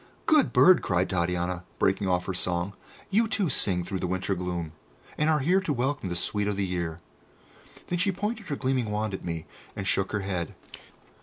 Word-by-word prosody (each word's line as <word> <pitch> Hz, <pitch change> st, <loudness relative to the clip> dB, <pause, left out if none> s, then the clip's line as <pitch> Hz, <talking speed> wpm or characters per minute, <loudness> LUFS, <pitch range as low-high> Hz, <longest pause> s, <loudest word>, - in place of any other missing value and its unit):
"Good 305 Hz, -4 st, +4 dB
bird!" 185 Hz, -1 st, +7 dB
cried 90 Hz, 0 st, 0 dB
Titania, 90 Hz, 0 st, -1 dB
breaking 95 Hz, +1 st, +1 dB
off 90 Hz, 0 st, +1 dB
her 95 Hz, -, -2 dB
song. 90 Hz, +1 st, -1 dB, 0.4 s
"You, 225 Hz, +3 st, +3 dB
too, 200 Hz, -5 st, 0 dB
sing 90 Hz, -8 st, +2 dB
through 95 Hz, +2 st, -3 dB
the 90 Hz, -, -1 dB
winter 95 Hz, +2 st, -1 dB
gloom, 90 Hz, -3 st, -3 dB, 0.4 s
and 150 Hz, +1 st, +1 dB
are 155 Hz, -, +4 dB
here 180 Hz, +7 st, +3 dB
to 185 Hz, -, -2 dB
welcome 135 Hz, -5 st, -1 dB
the 85 Hz, -, -2 dB
sweet 105 Hz, +3 st, +1 dB
o' 105 Hz, -, +1 dB
the 100 Hz, 0 st, 0 dB
year." 85 Hz, -3 st, -3 dB, 0.9 s
Then 175 Hz, -, -2 dB
she 195 Hz, +2 st, +2 dB
pointed 210 Hz, +2 st, -3 dB
her 145 Hz, -, -2 dB
gleaming 130 Hz, -4 st, 0 dB
wand 105 Hz, 0 st, -1 dB
at 95 Hz, -, -5 dB
me, 85 Hz, -2 st, -4 dB, 0.3 s
and 100 Hz, -, -4 dB
shook 95 Hz, -, +1 dB
her 105 Hz, -, -1 dB
head. 90 Hz, -4 st, -3 dB
100 Hz, 200 wpm, -27 LUFS, 90-145 Hz, 0.9 s, bird